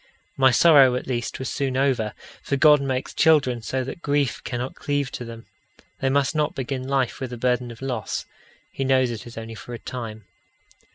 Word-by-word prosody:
My 130 0 +5
sorrow 135 -1 +6
at 125 - -3
least 120 -2 -3
was 130 - -4
soon 135 -2 -1
over, 130 -6 +1 0.3
for 140 - -1
God 150 +1 +6
makes 130 -1 -2
children 140 -7 +3
so 130 +3 -2
that 135 +6 -7
grief 145 -4 0
cannot 125 +1 -4
cleave 145 -2 -2
to - - -5
them. 115 -1 -9 0.5
They 135 - +1
must 140 +2 +2
not 150 -1 0
begin 130 0 -4
life 135 -3 0
with 130 -2 -5
a - - -5
burden 125 0 0
of 120 +2 -10
loss. 125 -5 -3 0.5
He 135 - -3
knows 130 -2 +3
it 115 0 -7
is 120 - -11
only 115 0 -6
for 120 +2 -8
a - - -6
time. 110 -4 -7
130 Hz, 195 wpm, -24 LUFS, 120-140 Hz, 0.5 s, sorrow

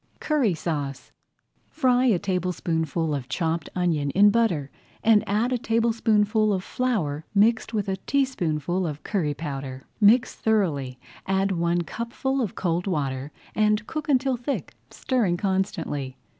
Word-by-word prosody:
CURRY 270 - +1
SAUCE 145 -5 -4 0.6
Fry 255 -4 +2
a 225 -7 +4
tablespoonful 170 -4 -1
of 135 -2 -4
chopped 160 +3 -1
onion 165 -6 +1
in 205 +7 +5
butter 190 -12 +1 0.3
and 220 -2 +5
add 225 +5 +1
a 245 - 0
tablespoonful 220 -2 +2
of 190 -2 -1
flour 185 - -1
mixed 225 +4 +3
with 210 -4 -1
a 190 0 -1
teaspoonful 180 - 0
of 150 -1 -6
curry 160 -8 -1
powder. 135 -3 -5 0.2
Mix 230 +3 +5
thoroughly, 155 - 0 0.3
add 195 +1 +1
one 170 -1 +1
cupful 240 - -2
of 220 - -3
cold 175 +1 -1
water, 140 -5 -2 0.2
and 210 0 +2
cook 310 +3 -5
until 265 -2 +2
thick, 245 +4 -4 0.2
stirring 220 -10 0
constantly. 165 -9 -2
190 Hz, 135 wpm, -25 LUFS, 155-225 Hz, 0.6 s, in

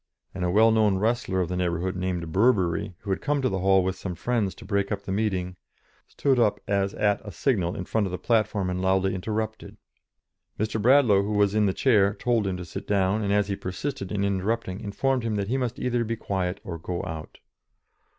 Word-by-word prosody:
and 95 - -4
a 90 - +1
well 110 +5 +5
known 105 -3 +3
wrestler 110 -3 0
of 90 - -1
the 90 - -3
neighbourhood, 90 +1 -1
named 90 -3 -3
Burbery, 100 -3 +2
who 100 - -4
had 95 - -1
come 145 0 0
to 130 -1 +1
the 95 - -2
hall 95 0 +4
with 95 0 -1
some 90 -1 -5
friends 105 +2 -1
to - - -12
break 100 0 -1
up 100 -1 -2
the 95 - -5
meeting, 95 -3 -1 0.5
stood 135 -3 +1
up 110 -3 +2
as 100 0 0
at 105 -1 +1
a 105 - -7
signal 90 - 0
in 90 - -5
front 105 0 0
of - - -6
the 90 - -3
platform 105 -5 +1
and 90 0 -2
loudly 95 0 +2
interrupted. 110 +3 -4 0.8
Mr. 110 +1 -1
Bradlaugh, 120 -4 +5
who 105 +2 -2
was 105 -1 +3
in 105 -1 +3
the - - +2
chair, 105 -3 +3
told 115 -4 0
him 95 -1 -2
to 90 - -7
sit 95 +4 -7
down, 100 +1 +1
and, 100 - 0
as 105 -1 +2
he 100 - -1
persisted 95 +2 -5
in 100 -1 -1
interrupting, 100 0 -1
informed 130 +6 -1
him 115 -2 -2
that 100 -1 -2
he 130 - +1
must 125 -2 -2
either 120 -1 0
be 115 0 -2
quiet 95 -4 -2
or 85 -3 -6
go 85 +2 -4
out. 80 -1 -7
100 Hz, 220 wpm, -26 LUFS, 95-110 Hz, 0.8 s, well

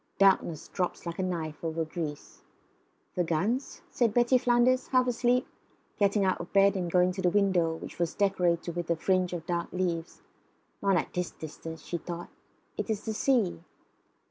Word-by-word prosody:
Darkness 190 -5 +3
drops 180 -1 -3
like 170 +1 -5
a - - +2
knife 165 -5 -3
over 165 0 -1
Greece. 155 -2 -6 0.7
"The 180 - +1
guns?" 195 - -1
said 230 -4 +1
Betty 240 +1 +4
Flanders, 245 +1 +3
half 255 -1 +3
asleep, 245 0 +2 0.5
getting 200 0 +3
out 185 - +1
of 175 - -9
bed 195 0 +5
and 180 -2 -1
going 180 +1 +4
to 190 +1 -4
the 180 - +3
window, 180 -4 +2
which 165 - -9
was 170 -2 -1
decorated 175 -4 +1
with 175 -1 -3
a 170 - +3
fringe 185 +2 +1
of 170 -2 -5
dark 170 -1 -2
leaves. 175 -2 -3 0.6
"Not 195 -1 +3
at - - -2
this 180 -1 -1
distance," 160 +1 -9
she 170 - -3
thought. 175 0 -6 0.5
"It - - -3
is 215 -1 -2
the 220 - -2
sea." 230 -5 +1
180 Hz, 175 wpm, -29 LUFS, 170-205 Hz, 0.7 s, bed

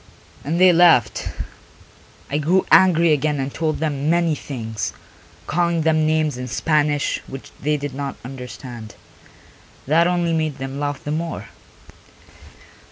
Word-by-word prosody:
And 160 +5 -1
they 185 -1 +7
laughed; 165 -9 +4 1.0
I 145 - 0
grew 175 +6 +2
angry 170 -3 +6
again 150 0 0
and 135 +1 -3
told 160 -1 -1
them 150 -2 -1
many 170 -1 +2
things, 115 -7 -5 0.5
calling 170 -1 0
them 155 -1 +2
names 155 -4 0
in 125 - -5
Spanish, 145 +3 0
which 135 0 -9
they 150 +1 +1
did 145 -2 -5
not 140 0 -4
understand. 125 -3 -9 0.9
That 165 +5 +3
only 175 -1 0
made 155 -3 -1
them 135 0 -5
laugh 145 -1 -3
the 150 - -4
more. 165 +2 -4
150 Hz, 135 wpm, -21 LUFS, 135-165 Hz, 1.0 s, they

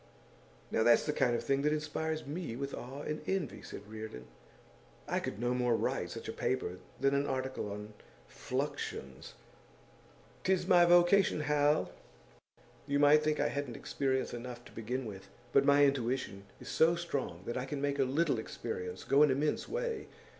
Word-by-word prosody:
'Now - - +2
that's 120 +1 +5
the 150 - 0
kind 120 -4 +2
of - - -2
thing 135 0 +1
that 150 +1 +2
inspires 155 +1 -2
me 150 -4 -4
with 140 +2 -4
awe 135 +4 -6
and 150 0 -3
envy,' 190 -8 -2
said 100 - -9
Reardon. 110 - -7 0.8
'I - - 0
could 100 - -5
no 120 +1 +1
more 125 -1 +2
write - - -1
such - - -7
a - - -4
paper 90 -8 -2 0.2
than 135 0 +3
an 140 +1 +1
article 130 -5 -2
on 105 +1 -7 0.3
Fluxions.' 130 - -4 1.1
''Tis 190 -1 +2
my 175 -1 +6
vocation, 175 0 +5
Hal! 150 0 +2 1.0
You 140 0 +1
might 145 +1 +6
think 150 -1 +1
I - - +2
hadn't 140 -4 -4
experience 130 -1 -1
enough, 120 0 -7
to - - -13
begin 125 +3 -3
with. 100 -3 -8 0.3
But 140 - +5
my 145 0 +6
intuition 125 -7 -1
is - - -11
so 165 +2 +4
strong 140 - -3
that 120 - -3
I 125 - -2
can 140 +1 -4
make 140 0 -1
a - - +5
little 140 0 +1
experience 90 -5 -5
go 140 +1 +4
an 150 - +7
immense 145 +3 0
way. 470 -2 -2
140 Hz, 175 wpm, -33 LUFS, 120-150 Hz, 1.1 s, an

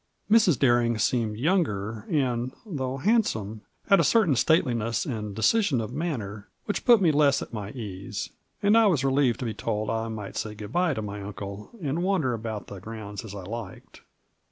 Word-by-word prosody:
Mrs. 210 - +5
Bering 120 -3 +3
seemed 110 -1 0
younger, 115 - 0
and, 125 -4 0
though 135 -9 -3
handsome, 120 - 0 0.2
had 195 - +5
a - - +4
certain 205 - +4
stateliness 115 - +2
and 105 -5 -4
decision 150 - +2
of 115 +2 -4
manner 115 - -4 0.2
which 205 - -3
put 235 -5 +6
me 165 - +5
less 145 -2 +3
at - - -12
my 105 -3 -4
ease, 100 -6 -6 0.3
and 205 +2 +5
I 225 -1 +6
was 155 -9 +2
relieved 135 -3 +2
to - - -2
be 110 - -2
told 110 -1 -2
I 115 0 -1
might 110 -3 -6
say 105 -1 -3
good 105 0 -8
by 175 -2 +1
to 110 - -3
my 105 0 -5
uncle, 100 0 -7
and 150 +4 -1
wander 180 -9 +1
about 110 -2 -4
the 100 - -9
grounds 105 0 -7
as 105 -3 -8
I 100 - -7
liked. 105 -1 -8
115 Hz, 185 wpm, -26 LUFS, 105-150 Hz, 0.3 s, put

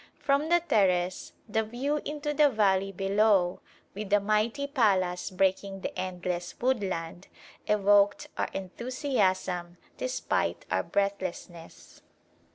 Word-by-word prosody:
From 285 +2 +1
the 345 0 +4
terrace 185 - +1
the 220 +1 +1
view 255 +7 -2
into 295 0 -3
the 295 0 +5
valley 195 -4 +2
below, 195 -1 +2 0.3
with 210 0 -6
the 205 0 +4
mighty 215 +7 0
palace 195 -11 +1
breaking 195 +1 0
the - - -5
endless 180 -1 -4
woodland, 190 -8 -2 0.4
evoked 205 +7 +3
our - - -1
enthusiasm 190 -5 -2 0.2
despite 255 0 -1
our - - +2
breathlessness. 185 -4 -4
200 Hz, 110 wpm, -28 LUFS, 185-245 Hz, 0.4 s, the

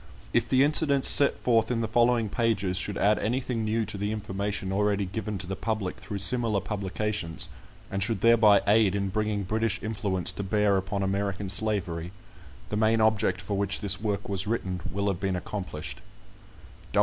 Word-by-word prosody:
If 120 0 +1
the 130 0 +4
incidents 145 -2 +3
set 140 - +7
forth 115 -2 +2
in 120 -2 -1
the 115 - -1
following 120 0 +2
pages 105 -5 0
should 100 +1 -1
add 105 +2 +2
anything 120 +1 -2
new 110 +1 0
to 105 0 -7
the 105 +1 -2
information 100 -2 -3
already 100 0 +1
given 105 +2 -4
to 90 - -3
the 95 +2 -4
Public 105 -3 -3
through 100 - -6
similar 110 +1 +3
publications, 100 -2 -3 0.4
and 95 - -2
should 105 -1 0
thereby 110 -3 +5
aid 105 -2 +3
in 100 -1 -1
bringing 105 0 -1
British 110 +3 -1
influence 100 -5 -1
to - - -6
bear 105 0 +1
upon 100 +1 -2
American 100 0 -2
slavery, 90 -5 -2 0.6
the 105 - -2
main 110 +1 +2
object 105 -4 +1
for 100 +2 -4
which 100 -2 0
this 100 0 -1
work 100 -2 -2
was 95 0 -1
written 95 -5 -2
will 100 +2 -2
have 95 -3 -1
been 95 -2 -1
accomplished. 90 -4 -6
105 Hz, 175 wpm, -27 LUFS, 95-110 Hz, 0.6 s, set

